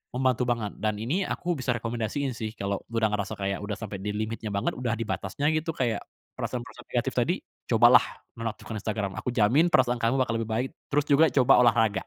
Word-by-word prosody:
membantu 130 -1 +2
banget. 115 -4 -1
Dan 110 -1 0
ini 150 - 0
aku 175 0 -1
bisa 125 -2 0
rekomendasiin 120 +4 -2
sih, 110 0 -5
kalo 100 0 -2
udah 110 -2 +1
ngerasa 100 -1 -2
kayak, 100 0 -2
udah 105 0 -3
sampe 105 -3 -6
di 105 - -3
limitnya 110 0 -3
banget, 100 - 0
udah 120 -2 -1
di 115 - -2
batasnya 110 +8 -3
gitu, 155 +1 -1
kayak 115 -5 0 0.3
perasaan - - -3
perasaan - - -13
negatif - - 0
tadi, - - +2 0.3
cobalah - - +6 0.3
menonaktifkan 115 0 -5
Instagram. 105 -2 -2
Aku 125 - -3
jamin 125 +10 +4
perasaan 125 -1 +4
kamu 115 +3 +1
bakal 115 -3 +1
lebih 115 0 -4
baik. 125 +4 0 0.2
Terus 145 0 +2
juga 145 +3 +6
coba 130 -1 +5
olahraga. 115 -3 +4
115 Hz, 200 wpm, -27 LUFS, 105-130 Hz, 0.3 s, cobalah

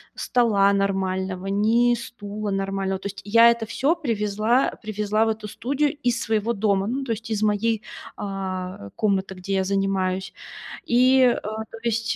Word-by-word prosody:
стола 210 -5 +3
нормального, 190 -1 -1
ни 225 +5 +3
стула 215 -3 -6
нормального. 195 -1 -2
То 200 - -5
есть 200 0 -8
я 230 +3 +7
это 235 -1 -2
всё 275 +8 +1
привезла 225 - 0
привезла 215 0 0
в 225 - +1
эту 215 -1 -3
студию 280 +8 -1
из 240 -1 +1
своего 220 +1 0
дома, 200 -1 +1
ну, 265 +3 -2
то 240 - -4
есть 225 +1 -8
из 215 0 0
моей, 215 +1 +1 0.3
а, 185 - -5
комнаты, 195 -2 0
где 195 +2 -3
я 190 - +2
занимаюсь. 190 -1 -1 0.5
И, 255 +2 +4
э, 250 -2 +4
то 220 +1 -6
есть, 230 -1 0
210 Hz, 160 wpm, -24 LUFS, 195-230 Hz, 0.5 s, я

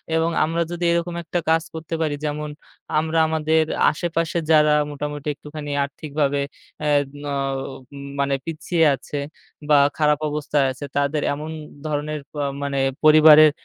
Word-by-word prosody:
এবং 165 +1 +2
আমরা 165 +2 0
যদি 175 0 -4
এরকম 170 0 -1
একটা 170 +2 -2
কাজ 160 0 +3
করতে 160 0 -7
পারি 155 -2 0
যেমন 150 0 -3 0.5
আমরা 160 +1 -1
আমাদের 160 0 +2 0.3
আশেপাশে 165 +1 -2
যারা 150 -1 +6 0.2
মোটামুটি 145 0 -5
একটুখানি 150 +1 -8
আর্থিকভাবে 145 0 -2 0.5
এদ 145 -1 +2 0.2
নও 135 -1 -2 0.6
মানে 140 0 +1
পিছিয়ে 165 +1 0
আছে 135 +3 -7 0.5
বা 150 - +6 0.2
খারাপ 150 -1 +3
অবস্থায় 150 -1 0
আছে 130 +2 -7
তাদের 145 +1 +1
এমন 150 +2 -6 0.4
ধরনের 150 0 -2
পা 150 - -3 0.2
মানে 140 -1 -1 0.3
পরিবারের 155 0 +8
150 Hz, 135 wpm, -22 LUFS, 145-160 Hz, 0.6 s, পরিবারের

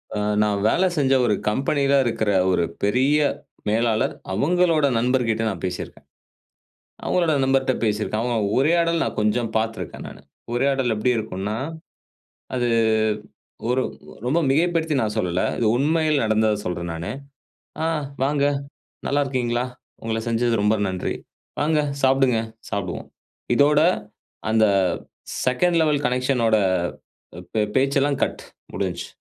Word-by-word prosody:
அ - - -1 0.2
நான் 105 -1 0
வேலை 185 +11 +3
செஞ்ச 135 -2 +3
ஒரு 110 - +2 0.2
கம்பெனிலாம் 140 +3 +2
இருக்குற 110 -2 0 0.2
ஒரு 90 - +2 0.2
பெரிய 130 +8 +3 0.5
மேலாளர். 110 0 +1 0.2
அவுங்களோட 165 - +2
நண்பர்கிட்ட 120 -2 +1
நான் 95 -4 -6
பேசிருக்கேன். 90 -1 -6 1.0
அவங்களோட 170 -3 +2
நண்பர்ட்ட 135 0 +2
பேசிருக்கேன். 105 0 -1
ஆமா, 120 -1 0 0.2
உரையாடல் 165 +4 +2
நான் - - -4
கொஞ்சம் 110 +2 +1
பார்த்திருக்கேன் 110 0 -4
நானு. - - -12 0.3
உரையாடல் 135 -1 +1
எப்பிடி 120 +3 +1
இருக்குன்னா, 105 0 -3 1.0
அது 120 -1 +1 1.0
ஒரு 125 +1 +2 0.5
ரொம்ப 150 +7 +2
மிகைப்படுத்தி 160 +1 +1
நான் 105 -1 -1
சொல்லல. 90 -4 0 0.2
இது 115 - +1
உண்மையில் 155 +1 +2
நடந்தத 110 0 +2
சொல்றேன் 85 -1 -3
நானு. 80 +1 -4 0.7
"ஆ - - +1 0.4
வாங்க 140 +1 +2 0.6
நல்லா 145 +1 +1
இருக்கீங்ளா? 125 -3 -1 0.4
உங்கள 115 0 -1
செஞ்சது 115 0 +1
ரொம்ப 105 +1 +3
நன்றி. 95 -1 -3 0.4
வாங்க 155 +1 +2 0.2
சாப்புடுங்க, 130 -3 +3 0.3
சாப்புடுவோம்." 100 -4 -4 0.5
இதோட 145 +1 +5 0.7
அந்த 110 0 +4 0.8
செகண்ட் 165 +7 +2
லெவல் 150 -2 +1
கனெக்ஷன் 125 0 +1
ஓட 110 - +4 1.0
பே 110 - +2
பேச்செல்லாம் 140 +1 +2
கட் - - -2 0.3
முடிஞ்சு. - - -3
125 Hz, 120 wpm, -23 LUFS, 110-140 Hz, 1.0 s, இதோட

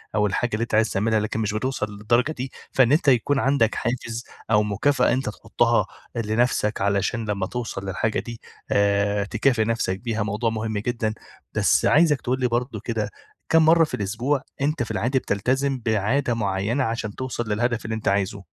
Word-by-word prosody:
أو 105 - +3
الحاجة 115 +4 -1
اللي 110 - 0
أنت 115 - -2
عايز 110 0 +3
تعملها، 110 +3 +1
لكن 110 +1 -2
مش 105 -1 -1
بتوصل 130 +1 -1
للدرجة 120 +7 +1
دي. 130 -2 -5 0.2
فإن 130 -2 +4
أنت 150 0 +2
يكون 135 +2 +4
عندك 130 -4 +2
حافز 120 0 -3 0.3
أو 105 0 +5
مكافأة 115 +6 +2
أنت 130 -3 -1
تحطها - - +1 0.3
لنفسك 110 -2 0
علشان 100 +3 0
لما 100 -2 -1
توصل 115 -4 -5
للحاجة 95 +3 -1
دي، 115 -1 -8 0.3
آآ، 100 0 +2
تكافئ 115 +2 +1
نفسك 110 -4 -1
بيها، 115 -3 -2
موضوع 110 +3 -1
مهم 110 -1 -3
جدًا. 110 0 -1 0.4
بس - - +3
عايزك 150 -2 +4
تقول 130 +1 -1
لي 125 - +2
برضه 120 -2 -2
كده، 110 -3 -2 0.4
كام 165 -1 +5
مرة 165 +1 +6
في 150 - -3
الأسبوع 120 +8 -1 0.2
أنت 145 -3 +1
في 110 - -5
العادي 125 +5 +1
بتلتزم 130 +6 0
بعادة 120 +5 +1
معينة 105 +4 0
عشان 115 -3 -3
توصل 120 -3 -4
للهدف 120 +2 0
اللي 110 0 -2
أنت 110 - -5
عايزه؟ 100 0 0
115 Hz, 180 wpm, -24 LUFS, 105-125 Hz, 0.4 s, مرة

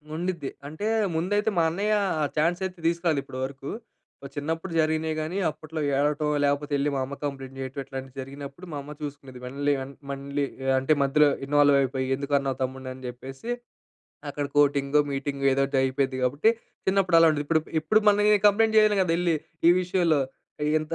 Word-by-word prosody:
ఉండిద్ది. 170 -4 -3 0.2
అంటే 155 +8 -4 0.3
ముందైతే 205 +6 +1
మా 165 - +4
అన్నయ్య 210 +4 +1 0.3
ఆ - - +2
చాన్స్ 170 +4 +2
అయితే 185 -1 -6
తీసుకురాలేదు 170 -4 +1
ఇప్పటి 130 -1 -8
వరకు. 135 +1 -7 0.5
ఓహ్, 140 - -8
చిన్నప్పుడు 165 +5 -3
జరిగినియి 160 0 +1
గాని 155 +5 -3
అప్పట్లో 155 +1 -8 0.2
ఏడవటం 150 +1 +1 0.2
లేకపోతే 145 +1 0
యెళ్ళి 140 +1 +1
మా - - 0
అమ్మ 140 +2 -7
కంప్లెయింట్ 135 -2 -5
జేయటం. 135 +1 -5
ఇట్లాంటివి 135 0 -8
జరిగినప్పుడు 140 +5 -9
మా 145 - -4
అమ్మ 145 +2 -10
చూసుకునేది. 135 -3 -8
మళ్ళీ 140 +3 0
అం 135 - -9 0.2
మళ్ళీ 140 +1 -2 0.3
అంటే 135 +4 +2
మధ్యలో 145 +2 +4 0.2
ఇన్వాల్వ్ 145 0 +4
అయిపోయి, 130 0 -1
"ఎందుకున్నావు 140 -1 -1
తమ్ముడ్ని?" 130 0 -5
అని 130 0 -13
జెప్పేసి, 135 - -8 0.8
అక్కడ 145 0 -3
కోటింగో, 145 0 +3
మీటింగో 140 0 -3
ఏదో 135 - +1
ఒకటి 135 0 -2
అయిపోయిద్ది 130 0 0
గాబట్టి 145 - +3 0.4
చిన్నప్పుడు 190 -2 +3
అలా 165 0 +7
ఉండేది. 150 -2 0
ఇప్పుడు 160 +1 +3 0.2
ఇప్పుడు 185 +8 +3
మనం 205 0 +5
ఏ - - +4
కంప్లెయింట్ 220 +2 +3
చేయను 215 -1 +5
గదా! 180 -3 +2
యెళ్ళి 175 -1 +1 0.3
ఈ - - +9
విషయంలో. 175 -4 +2 0.5
ఇగ - - +1
ఇంత 155 +1 -6
145 Hz, 175 wpm, -26 LUFS, 135-165 Hz, 0.8 s, ఈ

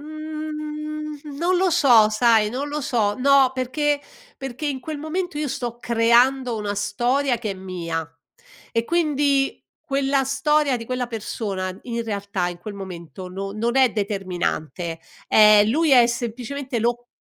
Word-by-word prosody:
Mhmm, 305 -1 -6
non 350 +4 +1
lo 370 0 +2
so, 250 -10 +6
sai? 220 -1 +3
Non 270 +5 -3
lo 295 +1 -3
so. 225 -7 0
No, 275 0 +4
perché 285 +3 0 0.4
perché 270 +1 -5
in 275 -3 -2
quel 305 +3 -6
momento 325 +2 -3
io 300 -1 -1
sto 240 -2 -4
creando 240 +2 +3
una 205 -1 -3
storia 245 +6 0
che 220 -3 -3
è - - -3
mia 170 -4 -4 0.6
e 230 0 +1
quindi 290 -4 +1 0.2
quella 275 -2 +1
storia 280 0 +2
di 230 - -7
quella 250 +1 -2
persona, 200 -4 -4
in 235 -1 -3
realtà, 200 -4 -2
in 175 -1 -7
quel 205 +3 -8
momento, 185 -1 -8
no 195 +2 -5
non 230 +4 -1
è 260 -2 +5
determinante, 180 -5 -3 0.3
ehm, 210 -1 +7
lui 315 +5 +2
è 245 -3 +7
semplicemente 245 +2 -4
lo 240 +1 -1
245 Hz, 150 wpm, -23 LUFS, 210-290 Hz, 0.6 s, ehm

